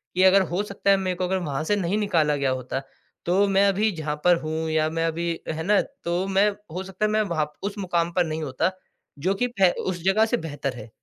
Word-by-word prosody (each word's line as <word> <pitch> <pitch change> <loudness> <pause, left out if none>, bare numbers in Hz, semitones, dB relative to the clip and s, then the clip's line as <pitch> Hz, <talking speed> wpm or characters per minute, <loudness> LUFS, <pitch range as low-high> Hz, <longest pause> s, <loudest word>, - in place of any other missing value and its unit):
कि 185 - +3
अगर 190 +1 +6
हो 190 +4 +1
सकता 200 -1 0
है, 195 - +5
मेरे 185 -1 -1
को 185 - 0
अगर 190 +1 0
वहाँ 155 -5 -3
से 205 +6 +1
नहीं 195 0 0
निकाला 165 -8 +2
गया 140 -2 0
होता, 130 +1 -3 0.4
तो 190 +4 +3
मैं 195 0 +4
अभी 205 +3 +2
जहाँ 155 -2 -3
पर 180 0 +7
हूँ 160 +1 -3
या 155 0 +2
मैं 165 +1 -1
अभी 170 +1 -1
अ, - - -1
है 160 0 -4
ना? 205 +3 +4
तो 180 -9 -3
मैं 195 +2 +3 0.2
हो 185 +2 -3
सकता 190 +2 -2
है, 210 - +1
मैं 215 0 +2
वहाँ 170 -7 0
प - - -38
उस 200 +1 -3
मुकाम 175 -3 0
पर 180 -1 +2
नहीं 160 0 -3
होता 135 +5 0 0.5
जो 185 +7 +1
कि 245 +5 0
फै 185 -2 +6 0.2
उस 180 -2 -2
जगह 205 +3 +4
से 235 +2 0
बेहतर 145 - -4
है। 110 0 -9
180 Hz, 255 wpm, -24 LUFS, 160-195 Hz, 0.5 s, पर